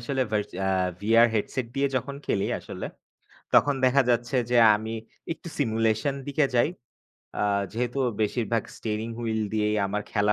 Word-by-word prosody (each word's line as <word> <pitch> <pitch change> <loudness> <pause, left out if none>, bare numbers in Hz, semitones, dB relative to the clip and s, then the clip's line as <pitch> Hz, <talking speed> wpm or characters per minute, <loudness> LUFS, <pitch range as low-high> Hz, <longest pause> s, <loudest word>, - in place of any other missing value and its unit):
আসলে 135 +2 -2
ভাইস 105 -1 0 0.2
আ - - +1 0.3
VR 115 +3 +5
headset 115 +3 -1
দিয়ে 140 0 +2
যখন 135 +3 -3
খেলি 100 - +1
আসলে। - - -7 0.7
তখন 145 - +5
দেখা 135 +2 +5
যাচ্ছে 120 +2 +1 0.2
যে 120 - +4 0.2
আমি 110 +2 -4 0.4
একটু 175 - -12
সিমুলেশন 115 +1 +1
দিকে 145 0 +2
যাই। 120 +6 +4 0.7
আ - - +1 0.3
যেহেতু 120 +3 -2 0.2
বেশিরভাগ 115 +1 0
স্টিয়ারিং 110 +1 -3
হুইল 110 -2 -1
দিয়েই 105 0 +1
আমার 105 +1 -2
খেলা 105 0 +3
115 Hz, 150 wpm, -26 LUFS, 110-130 Hz, 0.7 s, VR